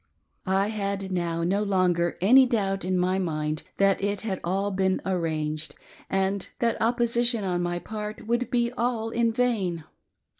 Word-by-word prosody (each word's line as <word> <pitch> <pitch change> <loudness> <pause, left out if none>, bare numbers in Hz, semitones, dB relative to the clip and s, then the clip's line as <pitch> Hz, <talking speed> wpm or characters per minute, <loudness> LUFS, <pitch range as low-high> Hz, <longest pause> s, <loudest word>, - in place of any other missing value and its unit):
I 195 +2 +2
had 200 -2 -3
now 170 -2 -1
no 195 +4 +1
longer 180 -4 +1
any 255 +7 +7
doubt 195 -5 0
in 185 +1 0
my 185 +1 +1
mind' 155 -3 -2 0.2
thdt 195 -1 +3
it 200 -1 -1
had 195 -4 -3 0.3
been 190 0 +1
all 190 - 0
"arranged," 155 -2 -2 0.3
and 195 0 0
that 230 -1 0
opposition 235 0 +2
on 180 -2 0
my 175 0 -1
part 210 +3 -6
would 240 +1 0
be 240 -1 +1
all 235 -2 -1
in 235 0 +2
vain. 215 -9 0
195 Hz, 155 wpm, -26 LUFS, 180-225 Hz, 0.3 s, any